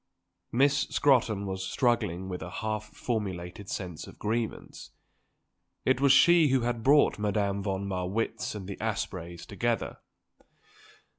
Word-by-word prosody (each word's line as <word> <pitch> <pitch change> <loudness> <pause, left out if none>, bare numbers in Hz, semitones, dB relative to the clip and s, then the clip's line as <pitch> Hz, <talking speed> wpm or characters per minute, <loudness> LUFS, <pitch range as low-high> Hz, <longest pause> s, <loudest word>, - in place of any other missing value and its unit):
Miss 140 +2 +3
Scrotton 120 -6 +2
was 95 -1 -3
struggling 95 -5 0
with 90 -1 -5
a 85 - -6
half 110 +3 -3
formulated 100 -4 -4
sense 90 -6 -5
of - - -13
grievance. 110 +1 -3 1.0
It 130 0 +2
was 140 -1 +6
she 170 +3 +6
who 130 -2 +2
had 120 -1 -1
brought 140 -1 +4
Madame 100 -1 0
von 100 0 -2
Marwitz 95 +4 -2
and 95 -3 -6
the 100 - -6
Aspreys 90 -5 -4
together. 115 +3 -2
105 Hz, 130 wpm, -29 LUFS, 95-120 Hz, 1.0 s, was